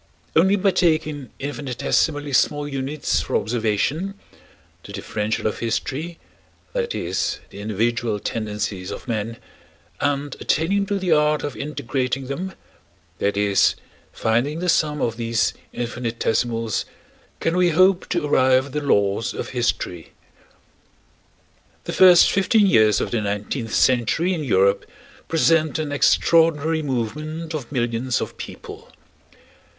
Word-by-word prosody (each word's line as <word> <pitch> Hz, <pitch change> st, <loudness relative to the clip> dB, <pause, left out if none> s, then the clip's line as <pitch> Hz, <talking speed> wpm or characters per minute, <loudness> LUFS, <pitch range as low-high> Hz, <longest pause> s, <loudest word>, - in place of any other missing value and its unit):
Only 190 Hz, +5 st, +5 dB
by 195 Hz, 0 st, +2 dB
taking 155 Hz, -6 st, 0 dB
infinitesimally 145 Hz, +1 st, -1 dB
small 145 Hz, +3 st, +2 dB
units 140 Hz, +1 st, -1 dB
for -, -, -3 dB
observation 120 Hz, -, 0 dB, 0.7 s
(the -, -, -10 dB
differential 105 Hz, 0 st, -3 dB
of 110 Hz, -, -1 dB
history, 135 Hz, +8 st, -3 dB, 0.6 s
that 480 Hz, -1 st, -2 dB
is, -, -, -1 dB
the 100 Hz, -, -10 dB
individual 110 Hz, +1 st, -1 dB
tendencies 105 Hz, -4 st, -3 dB
of -, -, -7 dB
men) 115 Hz, 0 st, -3 dB, 0.6 s
and 145 Hz, 0 st, -1 dB
attaining 195 Hz, +6 st, +1 dB
to 200 Hz, -, 0 dB
the 185 Hz, -3 st, -1 dB
art 150 Hz, -1 st, +3 dB
of 145 Hz, -, -4 dB
integrating 135 Hz, -2 st, -3 dB
them 180 Hz, +9 st, -4 dB, 0.7 s
(that 100 Hz, 0 st, 0 dB
is, 100 Hz, -1 st, +3 dB, 0.4 s
finding 120 Hz, +7 st, 0 dB
the 180 Hz, +1 st, -1 dB
sum 150 Hz, -3 st, +1 dB
of 115 Hz, -1 st, -1 dB
these 115 Hz, -1 st, 0 dB, 0.2 s
infinitesimals) 115 Hz, -2 st, -1 dB, 0.5 s
can 165 Hz, -, 0 dB
we 180 Hz, -1 st, +4 dB
hope 185 Hz, +3 st, +3 dB
to 175 Hz, -4 st, 0 dB
arrive 130 Hz, -2 st, +3 dB
at 140 Hz, -, -11 dB
the 150 Hz, -, -2 dB
laws 100 Hz, -5 st, +1 dB
of -, -, -4 dB
history. 115 Hz, -9 st, -2 dB, 1.7 s
The -, -, -5 dB
first 180 Hz, -2 st, +7 dB
fifteen 205 Hz, +2 st, +3 dB
years 110 Hz, -, +4 dB
of -, -, -3 dB
the 115 Hz, -, 0 dB
nineteenth 105 Hz, +3 st, -3 dB
century 130 Hz, +9 st, +2 dB
in 160 Hz, -4 st, -3 dB
Europe 100 Hz, -5 st, +2 dB, 0.4 s
present 165 Hz, -1 st, +2 dB
an 155 Hz, -2 st, -3 dB
extraordinary 160 Hz, +1 st, +3 dB
movement 150 Hz, +5 st, -3 dB
of 145 Hz, -5 st, -5 dB
millions 120 Hz, -1 st, -1 dB
of -, -, -5 dB
people. -, -, -9 dB
140 Hz, 125 wpm, -22 LUFS, 115-160 Hz, 1.7 s, first